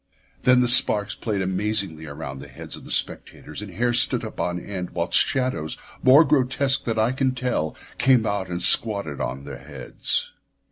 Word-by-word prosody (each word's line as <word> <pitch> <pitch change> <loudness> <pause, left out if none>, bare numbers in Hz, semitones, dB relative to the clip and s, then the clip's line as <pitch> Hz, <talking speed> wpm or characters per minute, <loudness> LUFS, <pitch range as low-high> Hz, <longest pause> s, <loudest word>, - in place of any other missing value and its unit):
Then 125 0 +4
the 125 - +1
sparks 105 -3 +5
played 105 -4 -4
amazingly 95 -4 -3
around 70 -2 -8
the - - -11
heads - - -9
of - - -14
the - - -12
spectators, 75 - -5
and 105 -2 -9
hair 120 +6 -1
stood 120 - +3
up - - -10
on 90 0 -3
end 90 -2 -7
whilst 85 0 +3
shadows 125 - -3 0.2
more 135 +5 +6
grotesque 135 -1 +1
than 115 -2 -2
I 110 +2 +1
can 130 0 -1
tell 125 -12 -3 0.2
came 125 -2 +3
out 100 -3 -3
and 90 0 -4
squatted 100 -8 +4
on 70 +1 -5
the 70 -2 -9
heads. 70 -1 -3
100 Hz, 180 wpm, -22 LUFS, 85-125 Hz, 0.2 s, more